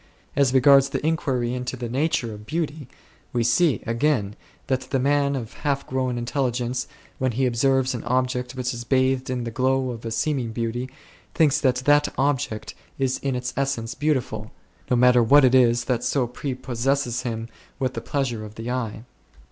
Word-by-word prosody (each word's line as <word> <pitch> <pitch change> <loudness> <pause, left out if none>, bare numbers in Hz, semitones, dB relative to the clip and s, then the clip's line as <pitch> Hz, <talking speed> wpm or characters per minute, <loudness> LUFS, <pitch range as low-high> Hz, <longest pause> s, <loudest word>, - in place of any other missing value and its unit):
As 140 -2 +3
regards 135 +1 +6
the 140 - -3
inquiry 130 -7 0
into 125 0 -4
the 120 -1 -4
nature 130 -2 0
of 105 0 -11
beauty, 155 -3 -3 0.5
we 120 -1 +1
see, 140 +6 +2
again, 115 -4 0 0.3
that 130 -1 0
the 135 - +1
man 140 +1 +2
of 120 -4 -5
half 140 -2 -2
grown 130 -1 -1
intelligence, 125 0 -1 0.3
when 130 -2 0
he 130 +3 +1
observes 130 +2 +2
an 120 - -5
object 125 +1 -1
which 125 0 -2
is 120 0 -6
bathed 130 +1 +1
in 125 -1 -2
the 115 - -4
glow 130 +1 +1
of 115 -1 -8
a 115 - -3
seeming 115 0 -1
beauty, 120 +2 -3 0.5
thinks 155 -2 +3
that 130 -3 +3
that 145 0 +5
object 135 -6 -1 0.2
is 135 -1 0
in 135 -2 -2
its 125 0 -3
essence 135 -4 -1
beautiful, 145 -4 -1 0.4
no 125 - +3
matter 125 0 +5
what 140 +5 +6
it 125 - +3
is 120 -2 +4
that 125 -1 -1
so 125 +1 +1
prepossesses 130 0 -2
him 115 -2 -4 0.3
with 130 -2 -1
the - - -4
pleasure 125 -6 -2
of 105 0 -10
the 115 +2 -5
eye. 115 -3 -3
130 Hz, 180 wpm, -24 LUFS, 120-135 Hz, 0.5 s, regards